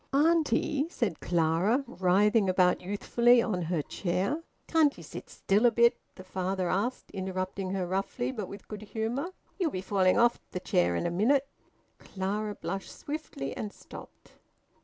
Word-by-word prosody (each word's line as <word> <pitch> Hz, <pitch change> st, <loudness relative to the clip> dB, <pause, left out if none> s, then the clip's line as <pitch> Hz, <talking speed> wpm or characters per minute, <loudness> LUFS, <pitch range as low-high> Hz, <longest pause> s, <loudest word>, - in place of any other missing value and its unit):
"Auntie," 300 Hz, -1 st, +2 dB
said 210 Hz, -, -2 dB
Clara, 175 Hz, -, +2 dB
writhing 205 Hz, -1 st, +3 dB
about 180 Hz, -1 st, +3 dB
youthfully 235 Hz, +5 st, +3 dB
on 210 Hz, -6 st, 0 dB
her 165 Hz, -2 st, -1 dB
chair. 195 Hz, -, -1 dB, 0.2 s
"Can't 315 Hz, -3 st, +3 dB
ye -, -, -10 dB
sit -, -, -9 dB
still 210 Hz, +5 st, +2 dB
a -, -, +4 dB
bit?" 235 Hz, +1 st, +4 dB, 0.2 s
the 185 Hz, -, -10 dB
father 185 Hz, 0 st, -2 dB
asked, 225 Hz, +7 st, -2 dB
interrupting 190 Hz, 0 st, -3 dB
her 190 Hz, -1 st, -1 dB
roughly, 195 Hz, +7 st, -2 dB
but 215 Hz, -7 st, -5 dB
with 200 Hz, +2 st, -10 dB
good 210 Hz, -1 st, -7 dB
humour. 225 Hz, -, -3 dB, 0.3 s
"Ye'll 350 Hz, -4 st, +2 dB
be 185 Hz, -, -4 dB
falling 190 Hz, -1 st, +2 dB
off 240 Hz, 0 st, +4 dB
th' 180 Hz, -, -5 dB
chair 85 Hz, 0 st, +2 dB
in -, -, -1 dB
a 170 Hz, -, 0 dB
minute." 260 Hz, +10 st, +2 dB, 0.5 s
Clara 205 Hz, +2 st, -3 dB
blushed 195 Hz, +2 st, -5 dB
swiftly, 295 Hz, -, -5 dB
and 210 Hz, -, -4 dB
stopped. -, -, -13 dB
200 Hz, 160 wpm, -29 LUFS, 185-240 Hz, 0.5 s, a